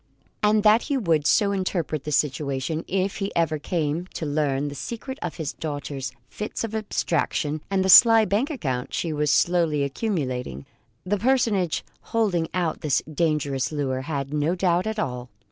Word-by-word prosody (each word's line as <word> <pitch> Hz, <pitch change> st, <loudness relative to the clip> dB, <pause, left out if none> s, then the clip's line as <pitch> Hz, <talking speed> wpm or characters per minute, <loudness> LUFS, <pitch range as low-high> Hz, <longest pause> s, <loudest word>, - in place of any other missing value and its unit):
And 210 Hz, 0 st, +3 dB
that 215 Hz, +2 st, +6 dB
he 280 Hz, -, +1 dB
would 165 Hz, -, +1 dB
so 205 Hz, -3 st, +3 dB
interpret 180 Hz, -6 st, -2 dB
the 150 Hz, -, -3 dB
situation, 145 Hz, +2 st, -1 dB
if 190 Hz, +1 st, -1 dB
he 195 Hz, -1 st, -3 dB
ever 160 Hz, -2 st, +1 dB
came 160 Hz, +2 st, -2 dB
to 160 Hz, -, -3 dB
learn 145 Hz, -1 st, 0 dB
the 145 Hz, -, -5 dB
secret 235 Hz, -, -6 dB
of 175 Hz, -, -4 dB
his 160 Hz, -4 st, -4 dB
daughter's 145 Hz, -4 st, -5 dB, 0.2 s
fits 210 Hz, +2 st, -5 dB
of 225 Hz, -1 st, -4 dB
abstraction 165 Hz, -7 st, -1 dB
and 190 Hz, -1 st, +1 dB
the -, -, +2 dB
sly 225 Hz, +3 st, +8 dB
bank 215 Hz, +8 st, 0 dB
account 135 Hz, -, -3 dB
she 165 Hz, -2 st, -1 dB
was 150 Hz, 0 st, 0 dB
slowly 160 Hz, -1 st, +2 dB
accumulating, 130 Hz, -, -3 dB, 0.4 s
the 205 Hz, +2 st, 0 dB
personage 225 Hz, -8 st, +1 dB, 0.3 s
holding 180 Hz, -7 st, +1 dB
out 175 Hz, -3 st, -1 dB
this 145 Hz, -3 st, +1 dB
dangerous 150 Hz, -4 st, 0 dB
lure 135 Hz, -3 st, -2 dB
had 140 Hz, -1 st, -4 dB
no 150 Hz, +4 st, +1 dB
doubt 180 Hz, +1 st, +1 dB
at 220 Hz, 0 st, -3 dB
all. 125 Hz, -, -3 dB
165 Hz, 165 wpm, -24 LUFS, 145-200 Hz, 0.4 s, sly